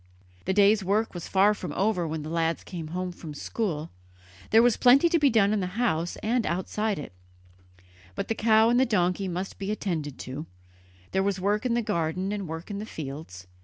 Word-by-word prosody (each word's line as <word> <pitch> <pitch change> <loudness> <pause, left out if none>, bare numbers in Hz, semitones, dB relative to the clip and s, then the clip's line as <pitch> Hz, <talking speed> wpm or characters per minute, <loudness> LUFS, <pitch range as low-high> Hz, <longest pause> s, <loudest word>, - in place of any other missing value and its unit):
The 190 - +1
day's 205 0 +5
work 210 +4 0
was 175 -2 -6
far 200 +2 +4
from - - -6
over 190 -4 0
when 155 -1 -4
the 155 - -6
lads 165 0 0
came 165 -4 -6
home 180 +3 -3
from 160 -4 -9
school. 165 -3 -3 0.6
There 225 +1 +6
was 245 -2 +4
plenty 270 +7 +6
to 335 - +3
be 290 -2 +5
done 215 -3 +3
in 215 - +1
the 185 +2 -4
house 175 -8 0
and 235 +2 +1
outside 205 +4 -1
it. 145 - -7 1.0
Both - - -3
the - - 0
cow 220 0 +4
and 245 - +4
the 260 - +5
donkey 185 -2 +1
must 185 +2 -4
be 195 0 -4
attended 165 -9 -3
to; 140 +5 -6 0.6
there 190 - +1
was 195 -1 0
work 210 +5 0
in 235 - +1
the 240 - +1
garden 185 -2 -1
and 200 -3 -3
work 160 +5 -6
in 200 - -4
the 210 - -5
fields. 135 - -7
195 Hz, 205 wpm, -27 LUFS, 165-215 Hz, 1.0 s, There